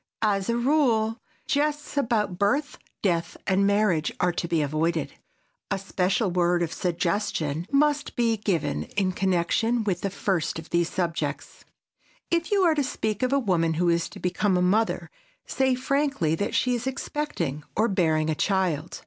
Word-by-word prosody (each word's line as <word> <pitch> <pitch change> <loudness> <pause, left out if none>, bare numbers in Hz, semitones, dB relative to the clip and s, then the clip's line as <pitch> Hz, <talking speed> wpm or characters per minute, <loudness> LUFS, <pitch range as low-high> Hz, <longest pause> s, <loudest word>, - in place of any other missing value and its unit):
As 200 -2 +1
a 235 - +1
rule, 240 -4 +2 0.3
jests 295 +2 -1
about 220 -9 0
birth, 280 +9 0 0.2
death 170 -4 0
and 195 +1 +2
marriage 200 -6 +2
are 180 - +2
to 170 0 -3
be 165 -3 +1
avoided. 160 +3 -1 0.6
A 195 - 0
special 195 +1 0
word 175 0 +2
of 165 - -3
suggestion 170 -3 -1
must 295 +1 +2
be 230 -2 +2
given 170 -9 -1 0.2
in 190 -2 +2
connection 190 +6 +1
with 190 -4 -1
the 200 - -1
first 185 -5 -1
of 160 0 -9
these 170 -1 +2
subjects. 170 -3 -3 0.7
If 335 +2 0
you 400 -2 +3
are 335 -3 +5
to 295 -2 +1
speak 220 -6 -2
of 255 0 +1
a 280 - +3
woman 170 -10 +1
who 175 +2 +2
is 170 0 +1
to - - -11
become 185 +1 +1
a - - +1
mother, 215 +5 +1 0.3
say 265 -1 +1
frankly 275 - 0
that 200 +7 -2
she 250 - +2
is 245 +1 -2
expecting 265 - -3
or 220 +2 +3
bearing 160 -6 +1
a - - +1
child. 175 -2 -1
195 Hz, 165 wpm, -26 LUFS, 170-245 Hz, 0.7 s, are